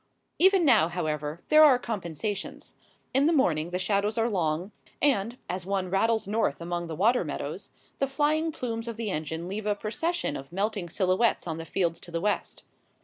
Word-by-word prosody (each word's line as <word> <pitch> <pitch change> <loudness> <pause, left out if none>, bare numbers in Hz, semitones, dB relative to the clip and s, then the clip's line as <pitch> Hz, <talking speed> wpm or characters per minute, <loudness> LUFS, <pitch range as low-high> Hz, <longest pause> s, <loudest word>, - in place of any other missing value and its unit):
Even 380 -1 +5
now, 225 - +5
however, 155 -2 -3
there 310 0 +8
are 280 -5 +7
compensations. 200 -4 -4 0.4
In 275 +3 +4
the - - +4
morning 170 - +2
the 180 - -2
shadows 200 +3 0
are 230 +1 +1
long, 175 0 -1 0.3
and, 240 -4 +1
as 185 0 -3
one 190 -1 -2
rattles 220 +2 +2
north 205 -9 0
among 175 0 -3
the 160 - -5
water 225 +9 +3
meadows, - - -5 0.3
the 275 - +1
flying 305 +4 +1
plumes 230 -5 -4
of 230 -2 -5
the 225 -3 -2
engine 160 +1 -4
leave 210 +3 -4
a 205 - +2
procession 325 +12 -2
of 135 - -8
melting 200 -1 -2
silhouettes 185 +5 +1
on 165 -2 -4
the 165 - -6
fields 170 -1 -1
to - - -12
the 170 -1 -2
west. 205 +3 -2
200 Hz, 185 wpm, -27 LUFS, 175-235 Hz, 0.4 s, there